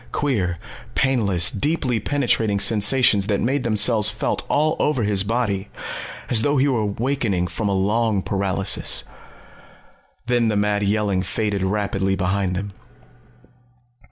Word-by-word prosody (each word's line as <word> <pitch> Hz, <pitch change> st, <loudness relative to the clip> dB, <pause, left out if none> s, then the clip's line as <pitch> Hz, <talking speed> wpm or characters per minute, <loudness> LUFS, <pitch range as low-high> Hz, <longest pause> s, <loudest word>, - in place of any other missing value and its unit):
Queer, 105 Hz, -, -1 dB, 0.4 s
painless, 105 Hz, -10 st, +1 dB
deeply 130 Hz, 0 st, -1 dB
penetrating 115 Hz, -5 st, 0 dB
sensations 105 Hz, 0 st, +4 dB
that 100 Hz, -2 st, 0 dB
made 135 Hz, +3 st, -1 dB
themselves 110 Hz, -1 st, +4 dB
felt -, -, -2 dB
all 155 Hz, +2 st, +1 dB
over 140 Hz, -6 st, 0 dB
his 100 Hz, -2 st, +2 dB
body 105 Hz, -3 st, -2 dB, 0.6 s
as 115 Hz, -3 st, +3 dB
though 145 Hz, +5 st, +1 dB
he 135 Hz, +2 st, +2 dB
was 125 Hz, -5 st, 0 dB, 0.2 s
awakening 115 Hz, -8 st, -1 dB
from 105 Hz, +3 st, -3 dB
a -, -, 0 dB
long 105 Hz, +1 st, 0 dB
paralysis. 95 Hz, -1 st, 0 dB, 1.2 s
Then 120 Hz, -1 st, +1 dB
the 105 Hz, -2 st, 0 dB
mad 105 Hz, 0 st, 0 dB
yelling 100 Hz, -2 st, 0 dB
faded 105 Hz, 0 st, -2 dB
rapidly 95 Hz, 0 st, -1 dB
behind 95 Hz, 0 st, -1 dB
them. 100 Hz, +2 st, -5 dB
105 Hz, 130 wpm, -21 LUFS, 100-120 Hz, 1.2 s, sensations